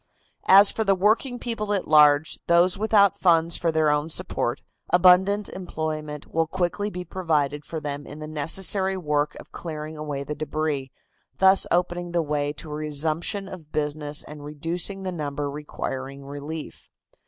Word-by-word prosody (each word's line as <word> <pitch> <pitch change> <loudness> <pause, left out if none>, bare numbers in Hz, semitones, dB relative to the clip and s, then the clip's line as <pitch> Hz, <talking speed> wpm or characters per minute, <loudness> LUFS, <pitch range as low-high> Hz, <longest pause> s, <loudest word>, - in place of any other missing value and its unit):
As 195 +2 +8
for 220 - -1
the 195 -2 +3
working 220 +6 +1
people 225 -4 -3
at 195 - -2
large, 150 0 +5
those 175 +1 +4
without 205 -2 +3
funds 165 -2 +3
for 170 -2 0
their 155 -1 +2
own 150 +2 0
support, - - 0 0.3
abundant 185 +3 +4
employment 155 -4 -5
will 165 0 -1
quickly 185 +4 -2
be 180 -2 -7
provided 150 -5 -1
for 160 - -5
them 145 -1 -5
in 145 - -9
the 155 0 -7
necessary 190 +5 +2
work 150 -4 -1
of - - -14
clearing 155 -2 -7
away 150 -2 -4
the 150 - -5
debris, 150 -2 -3 0.5
thus 190 0 +5
opening 175 0 -1
the 170 -1 +1
way 145 -1 -1
to 150 +1 -9
a - - -4
resumption 155 +6 -2
of 165 -6 -11
business 150 0 -2
and 150 -1 -11
reducing 165 +6 -3
the 185 - -3
number 145 -3 -4
requiring 140 -2 -6
relief. 145 +3 -8
160 Hz, 160 wpm, -24 LUFS, 150-185 Hz, 0.5 s, As